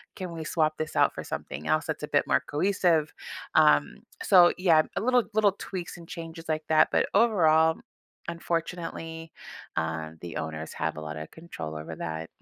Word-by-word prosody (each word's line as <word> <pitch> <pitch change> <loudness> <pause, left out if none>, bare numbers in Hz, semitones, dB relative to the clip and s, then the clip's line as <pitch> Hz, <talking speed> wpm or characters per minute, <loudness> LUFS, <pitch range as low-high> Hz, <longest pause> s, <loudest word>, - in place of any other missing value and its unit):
Can 185 -3 -6
we 165 -1 -6
swap 155 -1 +1
this 155 -1 -4
out - - +4
for - - -6
something 75 +2 -6
else 80 0 +2
that's - - -4
a - - -2
bit - - +2
more - - +3
cohesive?" 165 -1 +1 0.4
Um, 75 -1 +4 0.3
so, 175 -2 +7
yeah, 170 -4 +5
a - - -1
little 250 +1 +3
little 215 -2 +4
tweaks 180 -3 -6
and 170 -1 -12
changes 165 -1 -8
like 155 0 -1
that, 155 -1 +5
but - - +3
overall, 160 -7 +4 0.5
unfortunately, 165 -1 -4 0.5
um, 80 0 -3
the 85 -1 -6
owners 80 0 -5
have 80 0 -3
a - - -5
lot 75 0 -6
of 80 0 -7
control 85 - -8
over 80 +1 -6
that. 80 0 -4
160 Hz, 180 wpm, -27 LUFS, -, 0.5 s, so